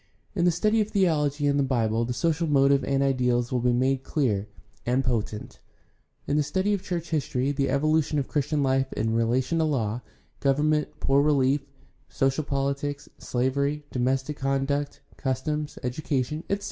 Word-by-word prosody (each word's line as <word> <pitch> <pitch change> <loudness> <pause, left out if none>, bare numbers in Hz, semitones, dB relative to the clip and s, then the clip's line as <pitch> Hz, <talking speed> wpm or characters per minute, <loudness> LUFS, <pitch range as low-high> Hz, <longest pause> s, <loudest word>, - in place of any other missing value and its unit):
In 175 -3 +1
the - - +6
study 215 +6 +2
of 210 - -1
theology 150 -8 +1
and 140 0 +2
the - - +3
Bible 115 -3 +1
the 125 - -3
social 165 +6 0
motive 140 -1 +4
and 140 0 +1
ideals 125 -3 +1
will 125 - +1
be 125 +1 +2
made 130 +2 +1
clear 110 -9 0 0.4
and 125 +2 +1
potent; 110 -3 -3 0.7
in 145 - 0
the - - +4
study 190 +8 0
of 200 - -1
church 170 -2 -4
history 140 -3 0
the 140 -1 0
evolution 155 +1 +1
of 140 - -1
Christian 145 0 0
life 135 0 +1
in 115 0 -1
relation 125 +7 +1
to - - +3
law, 120 -6 -1 0.4
government, 150 +2 +2
poor 135 +1 +3
relief, 140 -1 +3 0.5
social 135 +3 0
politics, 140 +1 -2
slavery, 140 +4 -1
domestic 130 +3 -1
conduct, 135 +1 -1 0.2
customs, 145 +3 -2
education, 140 +3 -2
etc. 200 - +1
140 Hz, 160 wpm, -26 LUFS, 130-150 Hz, 0.7 s, the